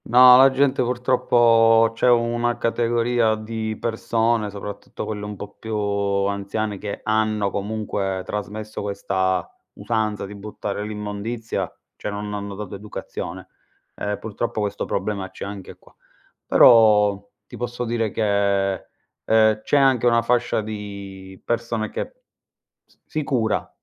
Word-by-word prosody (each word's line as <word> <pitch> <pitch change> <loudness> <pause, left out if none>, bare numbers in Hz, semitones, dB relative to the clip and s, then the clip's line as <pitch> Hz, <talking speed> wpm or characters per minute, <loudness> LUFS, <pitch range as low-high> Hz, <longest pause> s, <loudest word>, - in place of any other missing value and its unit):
No, 125 +1 +8
la 135 +1 +8
gente 130 0 +2
purtroppo 120 -2 +4
c'è 120 +2 +2
una 120 0 +2
categoria 115 -1 +1
di 110 0 -4
persone, 115 -1 0
soprattutto 100 0 -7
quelle 105 -1 -5
un 105 0 -6
po' 105 +1 -9
più 110 -1 -4
anziane, 100 0 -1
che 105 -1 -5
hanno 110 -2 +1
comunque 100 -2 -2
trasmesso 105 +1 -5
questa 95 -3 -1 0.3
usanza 110 -3 -2
di 100 - -9
buttare 105 0 -5
l'immondizia, 105 +2 -4 0.2
cioè - - -5
non 105 0 -5
hanno 100 -1 -5
dato 105 -1 -7
educazione. 100 +1 -7 0.5
Ehm, 105 0 -3
purtroppo 110 +1 -4
questo 100 -1 -2
problema 100 -1 -3
c'è - - -8
anche 100 -1 -8
qua. - - -23 0.5
Però 105 -4 +6 0.2
ti - - -11
posso 120 0 -4
dire 115 -1 -1
che, 100 -2 +1 0.5
ehm, 110 -1 +3
c'è 145 - +1
anche 130 -3 +4
una 115 -1 +3
fascia 120 -1 +1
di 100 -3 -8
persone 115 -2 -2
che - - -5 0.7
s - - -30
si 155 - -3
cura 120 -6 0
110 Hz, 130 wpm, -22 LUFS, 100-115 Hz, 0.7 s, No